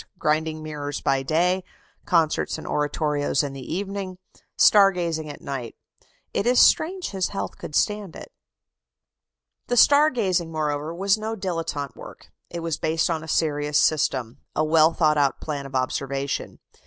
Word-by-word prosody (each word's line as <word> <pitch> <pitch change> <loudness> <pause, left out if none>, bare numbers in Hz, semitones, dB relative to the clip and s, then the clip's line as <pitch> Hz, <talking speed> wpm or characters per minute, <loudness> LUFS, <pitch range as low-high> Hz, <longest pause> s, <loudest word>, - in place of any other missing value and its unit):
Grinding 155 +1 -1
mirrors 145 -2 -5
by 135 -1 +1
day, 175 +6 +1 0.4
concerts 165 -4 +1
and - - -9
oratorios 150 -1 0
in 140 -1 -4
the 135 - -8
evening, 190 +4 -4 0.4
star 200 -2 +7
gazing 165 -4 -3
at 145 - -9
night. 130 -4 -5 0.6
It 200 - 0
is 245 0 +4
strange 365 +3 +3
his 190 -2 -1
health 100 -1 -5
could 150 - -7
stand 205 -4 0
it. - - -10 1.4
The 245 - 0
star 290 +5 +6
gazing, 185 - -1
moreover, 150 -1 -2
was 195 +4 +1
no 220 +1 -3
dilettante 165 -8 -4
work; - - -12 0.2
it 170 - -6
was 165 -2 -2
based 160 +2 0
on 160 -1 -2
a - - -9
serious 150 -2 +1
system 130 -6 +1 0.2
a 155 - +2
well 160 +1 +5
thought 155 -3 +2
out 140 -2 +1
plan 145 -3 -5
of 135 - -10
observation. 135 +2 -2
160 Hz, 155 wpm, -24 LUFS, 145-185 Hz, 1.4 s, star